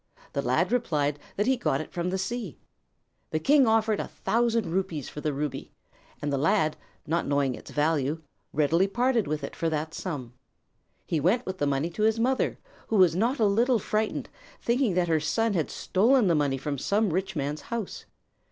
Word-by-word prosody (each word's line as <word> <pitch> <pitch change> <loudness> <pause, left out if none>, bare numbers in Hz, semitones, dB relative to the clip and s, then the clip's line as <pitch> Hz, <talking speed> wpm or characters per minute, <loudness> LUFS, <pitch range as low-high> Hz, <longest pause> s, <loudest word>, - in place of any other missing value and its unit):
The - - 0
lad - - +1
replied 150 -12 0 0.2
that 205 - +1
he 265 - +3
got 140 - 0
it 155 - -6
from 175 0 -2
the 190 - -1
sea. 195 - -4 0.7
The - - -1
king 275 - +5
offered 220 -1 +2
a - - -3
thousand 230 -1 0
rupees 175 -6 -2
for 150 - -7
the 150 - 0
ruby, 140 -1 -4 0.5
and 145 -1 -1
the 140 - +1
lad, 160 0 +2 0.3
not 165 +2 0
knowing 140 -2 +1
its - - -10
value, 150 0 0 0.3
readily 165 +6 +3
parted 240 +1 +1
with 150 -1 -2
it 140 - -5
for 165 - 0
that 155 +1 -3
sum. 140 -11 -5 0.7
He 160 - 0
went 195 - +2
with 185 -1 -5
the 145 - +1
money 140 +4 0
to 210 - -5
his 220 +1 +3
mother, 260 +3 +1 0.3
who 225 - -1
was 180 -5 +5
not 235 +9 +1
a 220 - +3
little 235 +5 +3
frightened, 215 +1 -1 0.3
thinking 235 -5 +1
that 180 -1 +2
her 160 -1 +2
son 225 +8 0
had 165 -5 0
stolen 235 +5 +3
the 175 - +3
money 145 -3 +1
from 140 +1 -3
some 205 - +1
rich 190 +1 -1
man's 145 +1 -2
house. 230 -5 -5
180 Hz, 195 wpm, -27 LUFS, 150-225 Hz, 0.7 s, king